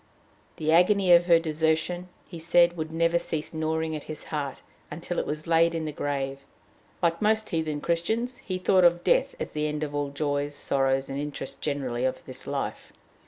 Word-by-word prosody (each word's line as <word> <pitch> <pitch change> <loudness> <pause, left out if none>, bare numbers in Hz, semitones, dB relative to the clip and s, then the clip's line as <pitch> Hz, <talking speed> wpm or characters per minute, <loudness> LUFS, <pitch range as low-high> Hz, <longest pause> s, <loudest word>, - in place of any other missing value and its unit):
The 155 0 0
agony 185 +2 +4
of 175 0 +6
her 170 -2 +7
desertion, 160 +2 -1 0.2
he 170 - -9
said, 170 +1 +4
would 160 -1 -4
never 165 +1 +2
cease 155 -2 -4
gnawing 160 0 -1
at 150 - -7
his 155 - -7
heart 145 -4 -4 0.3
until 170 +3 -4
it - - -3
was 155 +1 -4
laid 165 0 +3
in 160 -1 -2
the 155 - -3
grave; 140 -2 -3 0.6
like 170 0 +2
most 215 +1 +1
heathen 155 -3 -1
Christians, 220 +9 -1
he 185 -5 -4
thought 185 0 +3
of 175 0 +4
death - - +2
as - - -4
the 150 0 -1
end 150 0 -3
of 145 -1 -4
all 145 0 -1
the 140 - -11
joys, 145 0 -1
sorrows, 135 -1 0
and 135 - -4
interests 145 -2 -5
generally 130 -5 -2
of 130 - -2
this - - -6
life. - - -4
160 Hz, 195 wpm, -27 LUFS, 145-170 Hz, 0.6 s, her